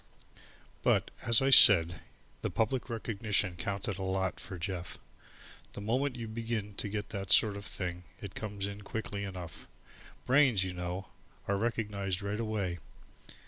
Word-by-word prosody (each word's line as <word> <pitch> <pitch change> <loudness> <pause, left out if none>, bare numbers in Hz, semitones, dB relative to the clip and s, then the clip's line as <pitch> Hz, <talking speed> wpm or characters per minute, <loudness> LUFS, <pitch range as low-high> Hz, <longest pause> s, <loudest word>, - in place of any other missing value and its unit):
But, - - +2
as 115 +2 +4
I 135 - +3
said, 85 -8 +8 0.4
the - - -1
public 120 +3 -1
recognition 105 -4 -1
counted 100 +2 -3
a - - -4
lot 95 0 -1
for 105 -7 -6
Jeff. 90 0 -5 0.8
The - - -7
moment 130 +6 0
you 115 -2 -5
begin 110 -2 -3
to 105 - -3
get 105 0 -4
that 100 -4 -5
sort 100 +4 +6
of 100 - -6
thing 90 -3 -4 0.2
it 100 -3 -8
comes 100 -2 -4
in 100 +1 -6
quickly 100 -1 -4
enough. 90 -5 -7 0.6
Brains, 130 -7 +4
you 95 -1 -3
know, 90 +2 -5 0.4
are 100 - +1
recognized 100 -3 -2
right 100 +2 -2
away. 105 -6 -2
100 Hz, 150 wpm, -31 LUFS, 95-110 Hz, 0.8 s, said